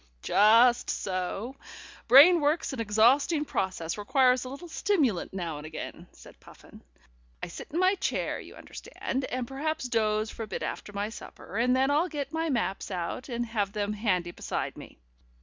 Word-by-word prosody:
"Just 230 Hz, +4 st, +5 dB
so. 195 Hz, +6 st, -3 dB, 0.5 s
Brain 300 Hz, +8 st, +8 dB
work's 295 Hz, 0 st, 0 dB
an 260 Hz, -, -6 dB
exhausting 245 Hz, +8 st, +3 dB
process; 185 Hz, -, -3 dB
requires 250 Hz, +4 st, +3 dB
a 255 Hz, -, -7 dB
little 280 Hz, +6 st, -9 dB
stimulant 310 Hz, -, 0 dB
now 170 Hz, -5 st, -4 dB
and 150 Hz, -, -9 dB
again," -, -, -8 dB
said -, -, -16 dB
Puffin. -, -, -16 dB, 0.6 s
"I -, -, -2 dB
sit -, -, -9 dB
in 315 Hz, -, -4 dB
my 370 Hz, +1 st, +4 dB
chair, 395 Hz, -, -2 dB
you -, -, -12 dB
understand, 265 Hz, 0 st, -5 dB
and 250 Hz, -1 st, -4 dB
perhaps 280 Hz, +1 st, -3 dB
doze 215 Hz, -2 st, 0 dB
for -, -, -9 dB
a 220 Hz, -, -4 dB
bit -, -, -5 dB
after -, -, -5 dB
my 205 Hz, +1 st, -3 dB
supper, 210 Hz, -3 st, -11 dB
and 245 Hz, +3 st, +2 dB
then 265 Hz, +2 st, +2 dB
I'll 315 Hz, +5 st, +2 dB
get 290 Hz, -1 st, -5 dB
my 325 Hz, 0 st, -1 dB
maps 235 Hz, -7 st, -2 dB
out, 185 Hz, +8 st, -4 dB
and 240 Hz, -1 st, -2 dB
have 210 Hz, -4 st, -2 dB
them 210 Hz, -1 st, -2 dB
handy 185 Hz, -5 st, -1 dB
beside -, -, -4 dB
me. -, -, -12 dB
240 Hz, 175 wpm, -28 LUFS, 205-280 Hz, 0.6 s, Brain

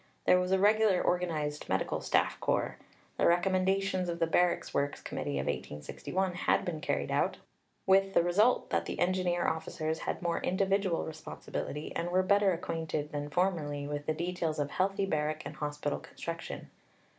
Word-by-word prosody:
There 180 Hz, -, +6 dB
was 180 Hz, 0 st, -1 dB
a 190 Hz, -, +5 dB
regularly 210 Hz, -1 st, +4 dB
organized 155 Hz, -5 st, -1 dB
Medical -, -, 0 dB
Staff -, -, +1 dB
Corps. -, -, 0 dB, 0.4 s
The -, -, +4 dB
recommendations 185 Hz, +1 st, +2 dB
of 170 Hz, -, -2 dB
the 165 Hz, -, +2 dB
Barracks 175 Hz, +2 st, +1 dB
Works 145 Hz, 0 st, 0 dB
Committee 70 Hz, -, -3 dB
of 65 Hz, -, -1 dB
1861 180 Hz, -, -3 dB
had 180 Hz, -, +1 dB
been 160 Hz, -3 st, -3 dB
carried -, -, -1 dB
out, -, -, +1 dB, 0.5 s
with 195 Hz, 0 st, +4 dB
the -, -, +6 dB
result 205 Hz, +8 st, +3 dB
that -, -, +1 dB
the -, -, -4 dB
engineer 180 Hz, -1 st, +1 dB
officers 160 Hz, 0 st, -2 dB
had -, -, -3 dB
more 170 Hz, -1 st, 0 dB
individual 195 Hz, -1 st, +1 dB
responsibility, 155 Hz, -1 st, -6 dB
and 170 Hz, +1 st, -1 dB
were 185 Hz, +1 st, +3 dB
better 200 Hz, +1 st, +4 dB
acquainted 160 Hz, -3 st, -3 dB
than 145 Hz, 0 st, -3 dB
formerly 150 Hz, -4 st, 0 dB
with 145 Hz, 0 st, -4 dB
the 155 Hz, -, +2 dB
details 170 Hz, -1 st, -2 dB
of 145 Hz, -1 st, -1 dB
healthy 195 Hz, +1 st, +1 dB
barrack 155 Hz, -3 st, -1 dB
and -, -, -7 dB
hospital 145 Hz, 0 st, -2 dB
construction. 170 Hz, 0 st, -7 dB
175 Hz, 165 wpm, -31 LUFS, 155-185 Hz, 0.5 s, There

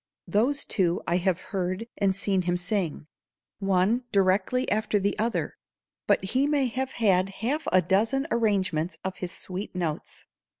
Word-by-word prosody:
Those 235 Hz, +10 st, +1 dB
two 180 Hz, -3 st, +1 dB
I 175 Hz, -, +1 dB
have 185 Hz, -1 st, +1 dB
heard 185 Hz, +3 st, -1 dB
and 195 Hz, -2 st, +1 dB
seen 195 Hz, -1 st, +1 dB
him 175 Hz, 0 st, 0 dB
sing, 180 Hz, -4 st, -2 dB, 0.5 s
one 195 Hz, +5 st, +2 dB
directly 195 Hz, +6 st, +2 dB
after 215 Hz, 0 st, +1 dB
the 200 Hz, 0 st, 0 dB
other, 230 Hz, +2 st, -1 dB, 0.5 s
but -, -, +3 dB
he 255 Hz, +9 st, +1 dB
may 290 Hz, -2 st, +2 dB
have 260 Hz, +3 st, -3 dB
had 195 Hz, -4 st, +2 dB
half 255 Hz, +10 st, -2 dB
a 185 Hz, 0 st, +5 dB
dozen 225 Hz, -, +2 dB
arrangements 190 Hz, -7 st, +1 dB
of 190 Hz, 0 st, -4 dB
his 180 Hz, -2 st, -4 dB
sweet 185 Hz, +3 st, -4 dB
notes. 165 Hz, -4 st, -3 dB
195 Hz, 155 wpm, -27 LUFS, 185-225 Hz, 0.5 s, a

